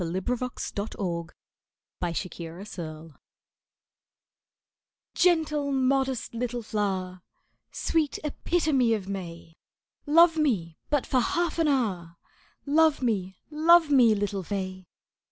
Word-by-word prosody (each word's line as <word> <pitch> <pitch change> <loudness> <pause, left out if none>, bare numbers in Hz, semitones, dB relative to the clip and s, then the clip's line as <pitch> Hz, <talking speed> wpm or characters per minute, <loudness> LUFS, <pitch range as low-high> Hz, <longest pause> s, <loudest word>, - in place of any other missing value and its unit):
S. 175 - -2
Gilbert._ 245 +8 -3 0.2
TO 170 -4 -4 0.7
PH[OE]BE 170 -2 -6 2.0
"Gentle, 305 -5 +2
modest 265 -2 0
little 240 0 -3
flower, 190 -4 -2 0.5
Sweet 315 -3 0
epitome 300 -6 +1
of 195 -3 -6
May, 170 -4 -7 0.5
Love 330 +2 +6
me 195 - 0
but 290 -3 +1
for 255 - +2
half 340 +7 0
an 325 - +3
hour, 190 - -1 0.5
Love 305 -1 +3
me, 190 -6 -1
love 320 +1 +5
me, 240 -6 +6
little 200 -1 -2
fay." 185 -1 -5
230 Hz, 100 wpm, -27 LUFS, 185-290 Hz, 2.0 s, Love